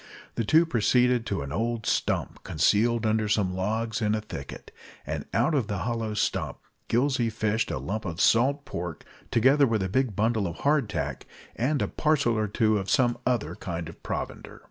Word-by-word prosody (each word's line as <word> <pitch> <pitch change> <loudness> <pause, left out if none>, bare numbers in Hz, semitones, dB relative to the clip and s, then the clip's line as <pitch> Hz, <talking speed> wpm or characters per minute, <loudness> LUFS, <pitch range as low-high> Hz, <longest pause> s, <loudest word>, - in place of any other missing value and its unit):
The 115 - -1
two 160 +10 +5
proceeded 125 -3 +2
to 100 -8 -2
an 70 - -7
old 115 +5 -2
stump - - -1
concealed 110 +9 +2
under 110 -1 +1
some 100 -3 +1
logs 110 +4 -2
in 105 0 +2
a 110 - -2
thicket, 70 -10 -8 0.3
and - - -4
out - - +2
of 130 -8 +1
the 100 - -2
hollow, 115 +3 -2
of - - -3
the - - -6
stump - - -1 0.3
Gillsey 125 -1 +2
fished 110 0 -1
a - - -2
lump 100 +12 -4
of 85 -1 -4
salt 135 +8 +3
pork, 85 -2 -6 0.2
together 135 +4 +4
with 110 -4 0
a 95 - -2
big 125 0 0
bundle 110 -1 +1
of 85 - -5
"hard 140 -6 +2
tack," 70 -9 -4 0.3
and 135 +4 0
a - - -1
parcel 145 -7 +1
or 110 -1 0
two 110 0 +2
of 95 - -5
some 120 -2 +3
other 125 -3 0
kind 85 -7 -5
of 85 - -12
provender. - - -5
110 Hz, 195 wpm, -27 LUFS, 100-120 Hz, 0.3 s, two